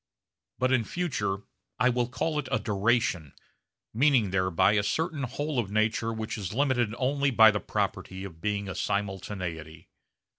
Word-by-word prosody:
But 130 Hz, +1 st, +1 dB
in 130 Hz, -3 st, +3 dB
future 105 Hz, -, -2 dB, 0.3 s
I 125 Hz, -, +3 dB
will 120 Hz, -1 st, +1 dB
call 150 Hz, +6 st, -1 dB
it 140 Hz, -, -4 dB
a -, -, +3 dB
'duration,' 100 Hz, -, 0 dB, 0.6 s
meaning 125 Hz, -5 st, +3 dB
thereby 95 Hz, 0 st, +3 dB
a 105 Hz, -1 st, +3 dB
certain 155 Hz, -, -1 dB
whole 140 Hz, +2 st, -2 dB
of 110 Hz, -5 st, -1 dB
nature 110 Hz, +2 st, +1 dB
which 110 Hz, 0 st, -4 dB
is 100 Hz, +1 st, -5 dB
limited 125 Hz, -5 st, +1 dB
only 140 Hz, +2 st, +1 dB
by 110 Hz, -4 st, +7 dB
the 105 Hz, -, -1 dB
property 95 Hz, -1 st, -3 dB
of 80 Hz, -4 st, -9 dB
being 100 Hz, +1 st, -1 dB
a 95 Hz, -, -4 dB
simultaneity. 90 Hz, -6 st, -4 dB
110 Hz, 155 wpm, -28 LUFS, 95-125 Hz, 0.6 s, by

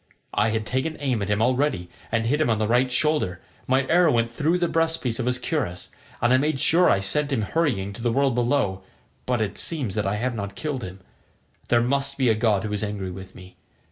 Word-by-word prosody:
I 105 Hz, +2 st, +2 dB
have 110 Hz, 0 st, -1 dB
taken 130 Hz, +7 st, -2 dB
aim 130 Hz, -6 st, -1 dB
at 100 Hz, -, -3 dB
him 105 Hz, +1 st, +2 dB
already 125 Hz, -7 st, +1 dB, 0.2 s
and 115 Hz, 0 st, +1 dB
hit 145 Hz, +6 st, +1 dB
him 140 Hz, -, +2 dB
on 110 Hz, -, +2 dB
the 110 Hz, 0 st, 0 dB
right 125 Hz, +3 st, +2 dB
shoulder; 125 Hz, -, 0 dB, 0.3 s
my 130 Hz, +1 st, +2 dB
arrow 170 Hz, 0 st, +4 dB
went 115 Hz, -1 st, +1 dB
through 155 Hz, +8 st, +1 dB
the 175 Hz, -1 st, +1 dB
breast 165 Hz, 0 st, +1 dB
piece 120 Hz, -2 st, -2 dB
of 125 Hz, -, -1 dB
his 125 Hz, 0 st, +1 dB
cuirass; 125 Hz, -, -3 dB, 0.3 s
and 120 Hz, +1 st, +4 dB
I -, -, +6 dB
made 145 Hz, 0 st, 0 dB
sure 175 Hz, +7 st, +4 dB
I -, -, +4 dB
should 95 Hz, -, -3 dB
send 145 Hz, +8 st, 0 dB
him 115 Hz, -5 st, 0 dB
hurrying 105 Hz, -8 st, -1 dB
to 115 Hz, -, -9 dB
the 120 Hz, 0 st, +1 dB
world 135 Hz, +1 st, +2 dB
below, 120 Hz, -6 st, 0 dB, 0.5 s
but 125 Hz, -2 st, +1 dB
it 105 Hz, -, -2 dB
seems 140 Hz, -, -2 dB
that 105 Hz, -1 st, -1 dB
I 100 Hz, -, 0 dB
have 125 Hz, +4 st, -1 dB
not 100 Hz, -3 st, -5 dB
killed 145 Hz, -6 st, -4 dB
him. 95 Hz, 0 st, -8 dB, 0.7 s
There 120 Hz, -1 st, +3 dB
must 140 Hz, +2 st, 0 dB
be 130 Hz, -3 st, +2 dB
a -, -, +5 dB
god 110 Hz, -3 st, +1 dB
who 105 Hz, -1 st, -3 dB
is 105 Hz, -, -2 dB
angry 100 Hz, -3 st, -4 dB
with 95 Hz, +1 st, -10 dB
me. 90 Hz, 0 st, -14 dB
120 Hz, 240 wpm, -24 LUFS, 105-140 Hz, 0.7 s, I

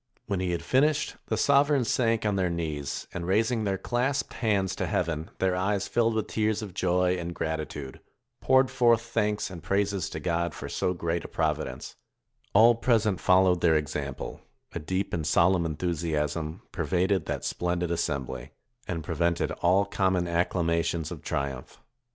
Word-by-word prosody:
When 100 Hz, -2 st, -2 dB
he 90 Hz, -1 st, -1 dB
had 85 Hz, -1 st, -2 dB
finished, 150 Hz, +3 st, +2 dB
the -, -, -1 dB
sovereigns 140 Hz, -3 st, +3 dB
sank 115 Hz, -2 st, +1 dB
on 105 Hz, -2 st, +1 dB
their 95 Hz, -2 st, +1 dB
knees, 75 Hz, -5 st, -3 dB
and 85 Hz, -1 st, -4 dB
raising 110 Hz, +3 st, +1 dB
their 95 Hz, -1 st, 0 dB
clasped 125 Hz, +7 st, -1 dB
hands 100 Hz, -5 st, 0 dB
to -, -, -1 dB
heaven, 80 Hz, -1 st, -1 dB
their 95 Hz, -1 st, +1 dB
eyes 100 Hz, +2 st, 0 dB
filled 115 Hz, -1 st, +1 dB
with 110 Hz, -, 0 dB
tears 110 Hz, 0 st, 0 dB
of 100 Hz, -4 st, -8 dB
joy 90 Hz, +1 st, +1 dB
and 85 Hz, 0 st, -5 dB
gratitude, 75 Hz, -4 st, -4 dB, 0.4 s
poured 130 Hz, 0 st, +4 dB
forth 120 Hz, -3 st, +4 dB
thanks 105 Hz, -4 st, -1 dB
and 85 Hz, -3 st, -8 dB
praises 100 Hz, 0 st, 0 dB
to 80 Hz, -, -5 dB
God 85 Hz, +1 st, -1 dB
for -, -, -6 dB
so 90 Hz, -, -1 dB
great 85 Hz, -1 st, -2 dB
a -, -, -6 dB
providence; -, -, -3 dB, 0.6 s
all 115 Hz, +4 st, +8 dB
present 110 Hz, -5 st, +1 dB
followed 90 Hz, -1 st, +4 dB
their 80 Hz, -2 st, +4 dB
example; 75 Hz, -2 st, -4 dB, 0.3 s
a -, -, -3 dB
deep 95 Hz, +5 st, -2 dB
and 80 Hz, -3 st, -1 dB
solemn 85 Hz, +2 st, +3 dB
enthusiasm 80 Hz, -1 st, -2 dB
pervaded 95 Hz, 0 st, 0 dB
that -, -, -3 dB
splendid 90 Hz, -1 st, -1 dB
assembly, 70 Hz, -5 st, -3 dB, 0.3 s
and 85 Hz, -4 st, -3 dB
pre 85 Hz, -, -4 dB
vented 85 Hz, +1 st, 0 dB
all 95 Hz, +3 st, +4 dB
common 95 Hz, -3 st, 0 dB
acclamations 85 Hz, -1 st, 0 dB
of -, -, -7 dB
triumph. 70 Hz, -2 st, -4 dB
90 Hz, 165 wpm, -27 LUFS, 85-105 Hz, 0.6 s, all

